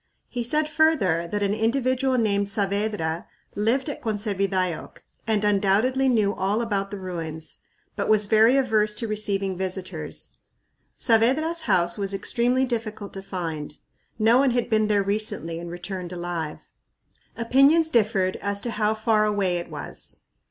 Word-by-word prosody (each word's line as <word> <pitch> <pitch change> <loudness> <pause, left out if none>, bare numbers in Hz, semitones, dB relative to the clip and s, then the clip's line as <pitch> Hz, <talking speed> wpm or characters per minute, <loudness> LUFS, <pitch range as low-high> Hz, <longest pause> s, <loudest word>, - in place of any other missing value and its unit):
He 245 -1 -3
said 300 +6 +1
further 285 - +2
that 205 0 0
an 200 0 +1
individual 255 +3 +1
named 200 -3 +1
Saavedra 200 -5 -1 0.3
lived 230 +7 +1
at 290 - -5
Conservidayoc 195 -5 -2 0.2
and 215 -2 +1
undoubtedly 210 +7 +2
knew 215 -5 +2
all 200 +3 0
about 200 -3 -1
the 205 - -6
ruins, 165 -4 -6 0.4
but - - -2
was 215 -1 +4
very 220 +5 +5
averse 215 -5 +2
to 230 - -3
receiving 200 -3 -1
visitors. 185 -4 -4 0.7
Saavedra's 270 +9 +2
house 175 +1 +2
was 200 0 -2
extremely 245 +6 +1
difficult 220 -4 -4
to 195 - -6
find. 165 -6 -5 0.4
"No 225 +3 +4
one 275 0 +4
had 240 -1 -1
been 215 -1 +3
there 205 -1 +2
recently 195 -5 -1
and 170 0 -7
returned 175 +1 -6
alive." 175 -3 -4 0.8
Opinions 275 +7 +4
differed 205 -5 +2
as 200 0 -2
to 240 - -3
how 215 0 0
far 215 -1 +2
away 200 -4 +1
it 170 - -7
was. 150 -2 -6
210 Hz, 145 wpm, -24 LUFS, 190-230 Hz, 0.8 s, very